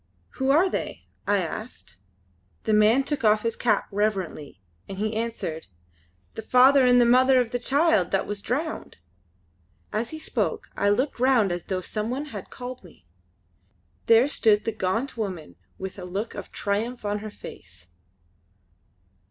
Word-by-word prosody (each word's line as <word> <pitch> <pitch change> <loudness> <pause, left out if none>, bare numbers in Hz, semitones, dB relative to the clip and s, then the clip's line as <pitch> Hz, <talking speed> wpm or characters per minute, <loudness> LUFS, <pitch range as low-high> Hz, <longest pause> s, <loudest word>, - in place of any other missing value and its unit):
"Who 265 0 +1
are 320 +7 +5
they?" - - -4 0.2
I 205 -2 +2
asked. 170 - -7 0.7
The 220 - 0
man 215 +5 +5
took 285 -1 -3
off 215 -1 +4
his 230 -1 -1
cap 240 - +1
reverently 195 - -2 0.3
as 195 - -6
he 215 +2 -2
answered: 220 -8 -4 0.7
"The - - -6
father 260 +4 +5
and 245 0 +6
mother 260 +1 +5
of 240 -2 0
the 245 - -1
child 270 - +2
that 195 - 0
was 205 -1 -4
drowned!" 295 +9 -3 1.0
As 225 +2 -1
he 315 - -6
spoke 315 - -2
I 200 - +2
looked 250 +6 0
round 245 -6 +3
as 175 -1 -4
though 185 -1 -2
some 215 +4 -4
one 270 +4 -3
had 200 -3 -7
called 250 -1 -8
me. 160 - -18 1.0
There 230 +3 +6
stood 215 -7 +2
the 225 - 0
gaunt 220 +6 -2
woman 185 -8 -5 0.2
with 190 +1 -7
a - - -7
look 195 +5 -4
of - - -8
triumph 215 +4 -2
on 205 0 -1
her 215 +1 -7
face. 85 - -12
215 Hz, 160 wpm, -25 LUFS, 195-250 Hz, 1.0 s, and